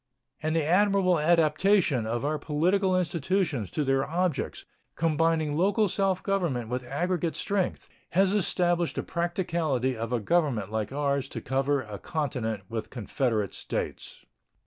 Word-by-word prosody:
And 155 +1 -1
the 160 -2 +1
admirable 185 0 +3
adaptation 160 - +3
of 120 +4 -2
our 150 +1 0
political 185 +6 +1
institutions 165 - 0
to 150 - -1
their 135 -1 +2
objects, 165 0 -2 0.3
combining 160 -1 +1
local 200 +5 +2
self 190 0 0
government 170 - -1
with 125 +1 -2
aggregate 170 +3 -1
strength, 200 -3 -1 0.3
has 195 +2 +4
established 175 -4 +1
the - - -2
practicability 170 -7 -1
of 115 +1 -4
a 125 - +1
government 120 - 0
like 110 +1 -2
ours 140 -1 -1
to - - -5
cover 135 +1 0
a 105 -3 -8
continent 120 -10 -3
with 110 0 -5
confederate 115 -3 -1
states. - - -5
155 Hz, 140 wpm, -27 LUFS, 130-180 Hz, 0.3 s, has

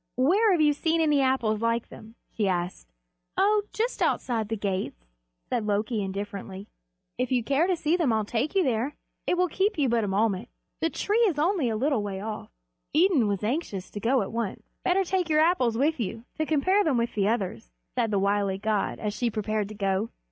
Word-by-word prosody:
"Where 375 - +4
have 350 -4 +3
you 300 -1 +5
seen 325 +3 0
any 300 -3 +3
Apples 240 -5 +1
like 230 0 0
them?" 220 +1 -13 0.2
she 210 -3 0
asked. 180 - -2 0.5
"Oh, 415 +2 +4
just 465 +3 -2
outside 225 -4 0
the 225 - -1
gates," 190 - -3 0.4
said 230 -4 -1
Loki 210 +2 0
indifferently. 195 0 -5 0.5
"If 250 0 -1
you 250 -2 +2
care 280 +8 +2
to 370 - +2
see 320 0 +1
them 330 -8 +2
I'll 220 -1 +1
take 240 - -2
you 385 - +4
there. 255 +1 0 0.3
It 360 - +2
will 365 0 +3
keep 390 +5 0
you 285 -3 +2
but 230 -1 +2
a - - -1
moment. 195 0 0 0.3
The 325 - +1
tree 415 +6 0
is 340 -7 -1
only 320 - +2
a 220 - -1
little 270 -1 +1
way 200 -2 -4
off." 215 +1 -6 0.5
Idun 320 - +4
was 200 -1 -1
anxious 215 - -2
to 205 - -5
go 240 +2 +2
at 195 - -6
once. 230 -3 -3 0.2
"Better 375 +2 +3
take 365 -2 -1
your 305 0 +4
Apples 260 -9 +2
with 295 +3 +1
you, 225 +1 -4
to 310 - -2
compare 370 +7 +3
them 295 -8 +2
with 235 0 0
the 200 -2 +1
others," 195 - -2 0.2
said 225 - 0
the 205 - +1
wily 200 0 +1
god, 210 0 -1
as 210 -1 -3
she 240 +2 0
prepared 215 -1 -1
to 215 - -8
go. 195 +1 0
235 Hz, 210 wpm, -27 LUFS, 205-310 Hz, 0.5 s, you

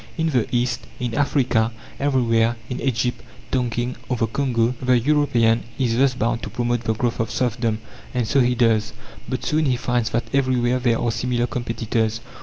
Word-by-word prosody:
In 160 -1 +1
the 125 -5 +1
East, 125 0 0
in 120 -2 -2
Africa, 125 -5 +2 0.3
everywhere, 120 -4 +2 0.2
in 125 - -3
Egypt, 125 -2 0 0.3
Tonkin 120 -1 -1
or 125 - 0
the 115 - +2
Congo, 120 0 0
the 125 -1 +4
European 120 -4 +3 0.2
is 120 -4 +1
thus 130 +1 +3
bound 120 0 0
to - - -5
promote 120 -1 -1
the 110 - +1
growth 120 +1 -1
of 115 -1 0
serfdom. 115 -1 0 0.3
And 125 -3 -1
so 140 - +3
he 125 -1 +3
does. 110 -2 +2 0.4
But - - -3
soon 155 +1 +1
he 130 - +2
finds 120 -2 0
that 115 +3 -2
everywhere 130 -2 +2
there 120 -2 +2
are 120 - 0
similar 120 +1 0
competitors. 115 -2 -1
120 Hz, 180 wpm, -22 LUFS, 115-130 Hz, 0.4 s, the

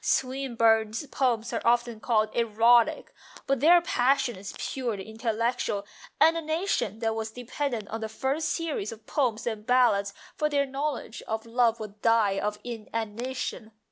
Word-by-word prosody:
Swinburne's 230 -3 +1
poems 245 -4 0
are 230 - -1
often 235 -1 +2
called 215 -2 +1
erotic, 230 +1 +3 0.3
but 275 -1 +1
their 340 +6 +7
passion 255 -4 +2
is 195 +2 -8
purely 230 -7 -3
intellectual, 225 -2 -1 0.3
and 325 +2 +6
a 330 - -1
nation 315 - -1
that 225 -1 +1
was 220 0 -3
dependent 245 -1 -4
on 225 +1 -4
the 220 - -3
first 275 +7 -1
series 305 - -2
of 220 -1 -11
Poems 240 -6 0
and 220 -3 -3
Ballads 235 -6 +3 0.2
for 300 - 0
their 285 -1 +2
knowledge 275 -3 -4
of 220 0 -3
love 235 0 +2
would 210 -1 -9
die 220 -4 +3
of 210 0 -2
inanition. 230 0 -5
230 Hz, 150 wpm, -27 LUFS, 220-265 Hz, 0.3 s, their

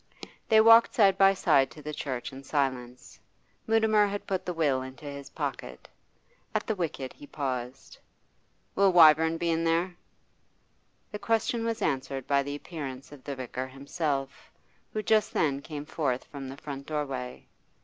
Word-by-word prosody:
They 220 - +6
walked 230 +1 +7
side 195 -4 +5
by 195 0 +5
side 145 -7 +3
to 155 - -13
the 150 +1 -5
church 135 -3 -4
in 135 - -9
silence: 130 -3 -3 0.5
Mutimer 220 -2 +4
had 200 0 -5
put 190 -2 -3
the - - 0
will 145 -6 +1
into 130 +3 -10
his 140 -1 -7
pocket. - - -5 0.7
At - - 0
the 220 - 0
wicket 160 -8 -4
he 145 - -13
paused. 130 -2 -5 0.7
'Will 195 -1 +4
Wyvern 160 -1 +6
be 170 0 0
in 165 0 0
there?' 170 +2 +1 1.2
The 210 - -5
question 225 +1 0
was 230 -2 -2
answered 135 -2 -2
by 140 -1 +2
the 145 +1 -4
appearance 145 -4 -7
of 145 -3 -13
the 140 - -5
vicar 130 0 -5
himself, 140 0 -4 0.4
who 215 - -3
just 215 0 +2
then 140 -4 +1
came 150 -1 -7
forth 140 -5 -2
from 135 -2 -8
the 135 - -8
front 140 -1 -8
doorway. 135 -5 -4
145 Hz, 160 wpm, -28 LUFS, 135-180 Hz, 1.2 s, walked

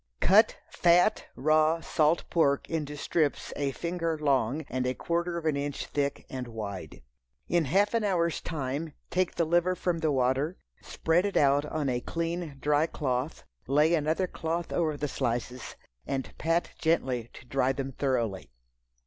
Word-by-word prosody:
Cut 215 +4 +5
fat, 175 +4 +3
raw 155 +3 +3
salt 160 0 +2
pork 140 -4 +2
into 150 -2 -3
strips 150 0 0
a 140 -1 -1
finger 165 +1 -2
long 140 -1 +1
and 130 0 -1
a 130 - -1
quarter 170 0 -1
of 165 - -5
an 155 -2 +2
inch 140 0 -3
thick 140 -1 -2
and 130 -2 -5
wide. 100 - -7 0.4
In 170 -2 +2
half 200 - +2
an 230 -1 +1
hour's 170 -5 +1
time 145 0 -3 0.2
take 185 -1 0
the 170 - +1
liver 175 +3 +2
from 175 -2 -1
the 160 -2 +1
water, 135 +5 +1 0.2
spread 165 +2 +1
it 200 - -1
out 145 0 +4
on 150 -1 -2
a 125 -1 0
clean 165 -2 -3
dry 150 +3 +2
cloth, 130 -1 -2 0.2
lay 150 +5 +4
another 160 +3 +1
cloth 165 -1 -3
over 155 -3 0
the 150 - -2
slices 125 -2 -3 0.3
and 135 -1 -3
pat 165 +2 +1
gently 130 -8 0
to - - -13
dry 135 0 +1
them 135 0 -4
thoroughly. 120 -8 -1
150 Hz, 160 wpm, -29 LUFS, 135-170 Hz, 0.4 s, Cut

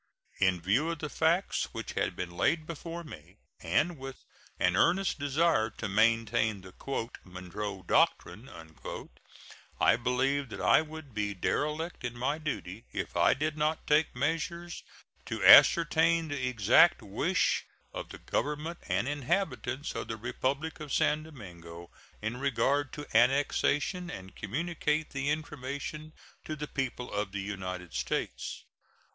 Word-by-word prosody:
In 95 -2 +3
view 115 - +1
of 170 - -2
the 150 0 -5
facts 170 +4 +1
which - - -5
had - - -1
been 90 -1 -4
laid 155 - +1
before 165 +1 -6
me, 90 - -12 0.2
and 145 - 0
with 135 0 -9 0.3
an 90 0 +2
earnest 175 - +2
desire 145 -4 +2
to 110 - -3
maintain 110 0 +2
the 95 0 -13 0.5
"Monroe 95 +2 -6
doctrine," 110 +7 +1 1.3
I - - +5
believed 130 +3 0
that - - -7
I - - +5
would 155 -4 -9
be 105 -1 -2
derelict 150 - -2
in 120 -1 -4
my 140 +5 -1
duty 115 - -5
if - - -4
I - - +4
did 155 +3 -1
not 155 +1 0
take 150 -1 +2
measures 165 +5 -2 0.5
to - - -3
ascertain 165 0 +7
the 135 -3 -2
exact 120 - +5
wish 100 -1 +1 0.3
of - - -6
the - - -9
Government 150 +4 -2
and 120 - 0
inhabitants 145 -2 -1
of - - -4
the 110 - -4
Republic 135 +8 -2
of 150 -2 -7
San 150 +3 +2
Domingo 85 - -11 0.3
in 110 +3 -2
regard 135 +2 +1
to 145 - -6
annexation 145 +7 +2
and 95 - -8
communicate 150 - -2
the 140 0 -2
information 150 +1 -4 0.3
to 155 - -4
the 150 0 -5
people 130 -4 -4
of 105 -1 -2
the 100 - -2
United 90 -4 -5
States. 60 0 -3
135 Hz, 140 wpm, -30 LUFS, 105-155 Hz, 1.3 s, ascertain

